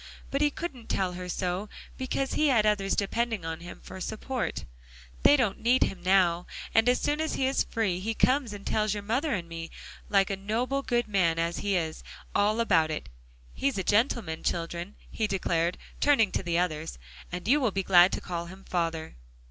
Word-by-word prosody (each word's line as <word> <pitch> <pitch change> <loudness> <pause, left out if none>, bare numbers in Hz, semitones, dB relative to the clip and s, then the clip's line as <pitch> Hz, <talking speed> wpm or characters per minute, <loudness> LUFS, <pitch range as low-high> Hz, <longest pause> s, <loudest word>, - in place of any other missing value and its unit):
But 275 - 0
he 295 - +4
couldn't 280 -6 -7
tell 185 -2 0
her 180 0 -6
so, 180 +3 -2 0.3
because 260 +1 -2
he 305 - +3
had 235 -6 +4
others 200 -2 +2
depending 225 -1 -1
on 165 0 -4
him 175 +1 -10
for 190 - -9
support. 235 +5 -3 0.6
They 290 - +6
don't 230 -7 0
need 245 +3 +4
him 195 - -3
now, 180 -2 +3 0.3
and 225 +2 +5
as 250 - +3
soon 295 +1 0
as 315 - -1
he 265 - +1
is 265 +1 +2
free, 200 -6 -1
he 220 +4 -2
comes 260 -2 +2
and 205 -1 -8
tells 215 -1 +1
your 205 - -5
mother 255 +9 0
and 175 -3 -4
me, 165 0 -6 0.4
like 195 -1 +3
a - - 0
noble 230 +8 -1
good 240 -3 0
man 180 -6 +2
as 170 +1 -1
he 200 -1 0
is, 160 -3 -2 0.3
all 210 +2 +2
about 170 -9 +3
it. 155 - -4 0.4
He's 275 -3 -1
a 190 - -1
gentleman, 205 - +1
children," 170 +3 -3 0.2
he 220 - 0
declared, 175 -3 0 0.2
turning 250 -9 +4
to - - -1
the 170 -2 -1
others, 160 - -1 0.3
"and 180 +2 -5
you 290 +5 +4
will 250 - +3
be 195 -1 -2
glad 180 -1 +6
to - - -2
call 170 -2 -4
him 190 +2 -12
father." 165 - -2
200 Hz, 200 wpm, -28 LUFS, 175-235 Hz, 0.6 s, They